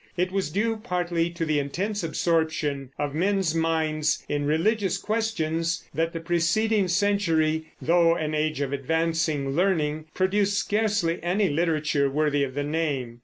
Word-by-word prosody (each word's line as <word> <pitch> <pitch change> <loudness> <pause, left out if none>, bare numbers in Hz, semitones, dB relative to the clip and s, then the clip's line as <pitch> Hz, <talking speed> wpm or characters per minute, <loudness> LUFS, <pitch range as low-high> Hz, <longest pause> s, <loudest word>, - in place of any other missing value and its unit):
It 180 +1 0
was 195 -4 -1
due 220 +7 0
partly 175 -5 -1
to 170 -1 -3
the 155 -2 +1
intense 195 +9 -2
absorption 160 -4 0
of 145 -1 -2
men's 190 0 +1
minds 160 -2 0
in 145 -1 -1
religious 190 +5 +1
questions 170 -7 -1
that 165 +1 0
the 165 - -5
preceding 180 +5 +1
century, 170 -5 +1
though 170 0 +3
an 155 -2 -2
age 155 -1 0
of 140 -1 -2
advancing 155 0 0
learning, 155 -2 0
produced 200 +2 +1
scarcely 205 -6 0
any 185 +4 +1
literature 150 -3 +1
worthy 145 0 +1
of 130 -1 -4
the 145 - -1
name. 145 -6 -2
165 Hz, 145 wpm, -25 LUFS, 150-185 Hz, -, though